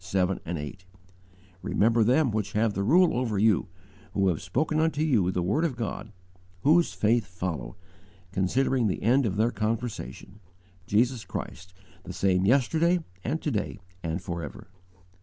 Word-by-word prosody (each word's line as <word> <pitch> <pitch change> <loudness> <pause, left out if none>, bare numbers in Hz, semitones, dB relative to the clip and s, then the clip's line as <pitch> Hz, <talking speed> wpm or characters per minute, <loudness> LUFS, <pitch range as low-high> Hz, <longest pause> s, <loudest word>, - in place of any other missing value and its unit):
7, 95 0 0
8: 85 +1 -5 0.8
"Remember 115 +1 +2
them 130 +3 +3
which 105 -1 -2
have 110 0 +1
the 100 - -2
rule 170 - +4
over 120 -4 -1
you, 105 -1 +3 0.5
Who 95 -1 +3
have 85 - -1
spoken 155 +3 0
unto 155 -1 +1
you 115 - +2
the 90 -1 -1
word 105 - +1
of 155 -7 0
God: 110 -2 -5 0.5
Whose 165 +4 +4
faith 110 -1 +1
follow, 85 -9 -5 0.6
Considering 120 +6 +1
the 95 - -2
end 125 +3 +3
of 95 - -2
their 110 +3 +2
conversation: 110 - -4 0.5
Jesus 120 +2 +2
Christ, 90 0 -7 0.3
the - - -7
same 95 -1 +2
yesterday 160 - +3 0.2
and 150 +7 -1
to 150 - 0
day 105 0 -3 0.2
and 80 +1 -2
forever." 85 -6 -6
110 Hz, 150 wpm, -27 LUFS, 95-130 Hz, 0.8 s, rule